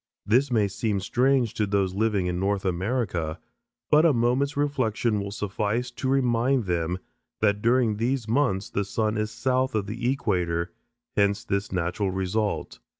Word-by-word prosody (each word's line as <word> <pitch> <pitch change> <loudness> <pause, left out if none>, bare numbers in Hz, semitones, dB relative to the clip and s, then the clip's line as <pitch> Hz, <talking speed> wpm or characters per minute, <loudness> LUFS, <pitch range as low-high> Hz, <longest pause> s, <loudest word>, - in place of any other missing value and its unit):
This 125 +6 +3
may 110 -5 +2
seem 100 +1 -1
strange 125 +3 +2
to 105 - 0
those 100 -2 +1
living 105 -2 +1
in 90 0 -1
North 100 +1 0
America, 90 -4 -1 0.5
but 150 +1 +6
a 165 -3 +5
moment's 125 +4 +1
reflection 120 -6 0
will 100 - -4
suffice 105 +4 -2
to 130 +2 -3
remind 125 -1 +2
them 90 -1 -1 0.4
that 105 -1 +2
during 115 -2 +2
these 120 +1 -1
months 110 -6 +1
the 100 - 0
sun 110 +2 -1
is 105 0 -1
south 130 +2 0
of 105 -2 0
the 120 +4 -1
equator, 90 -9 -1 0.4
hence 100 +1 +2
this 100 +1 -2
natural 90 +2 -1
result. 95 +3 -2
105 Hz, 155 wpm, -26 LUFS, 95-125 Hz, 0.5 s, but